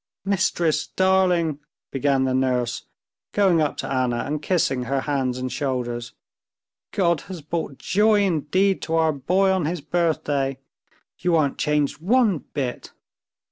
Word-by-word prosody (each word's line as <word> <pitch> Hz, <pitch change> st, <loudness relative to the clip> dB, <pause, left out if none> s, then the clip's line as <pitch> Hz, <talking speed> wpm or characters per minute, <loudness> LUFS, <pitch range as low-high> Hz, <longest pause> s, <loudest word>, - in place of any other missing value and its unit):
"Mistress, 175 Hz, -5 st, +1 dB
darling!" 180 Hz, -5 st, +2 dB, 0.3 s
began 135 Hz, 0 st, +1 dB
the 130 Hz, -1 st, 0 dB
nurse, 125 Hz, -2 st, 0 dB, 0.5 s
going 190 Hz, -5 st, +3 dB
up 150 Hz, -, -1 dB
to -, -, -4 dB
Anna 125 Hz, -3 st, 0 dB
and 150 Hz, +1 st, -3 dB
kissing 140 Hz, -7 st, 0 dB
her 135 Hz, +2 st, 0 dB
hands 130 Hz, -4 st, -1 dB
and 130 Hz, 0 st, -4 dB
shoulders. 120 Hz, -3 st, -3 dB, 0.8 s
"God 170 Hz, -5 st, +1 dB
has 180 Hz, -5 st, -7 dB
brought 155 Hz, -3 st, -4 dB
joy 210 Hz, +1 st, +3 dB
indeed 185 Hz, +2 st, +1 dB
to 165 Hz, -, -2 dB
our 160 Hz, -1 st, +3 dB
boy 185 Hz, +8 st, +2 dB
on 190 Hz, -4 st, +1 dB
his 170 Hz, +3 st, -2 dB
birthday. 145 Hz, -4 st, 0 dB, 0.6 s
You 175 Hz, -1 st, +1 dB
aren't 145 Hz, -4 st, +1 dB
changed 150 Hz, -1 st, 0 dB
one 215 Hz, -, +3 dB
bit." 130 Hz, -4 st, -5 dB
150 Hz, 140 wpm, -23 LUFS, 135-180 Hz, 0.8 s, going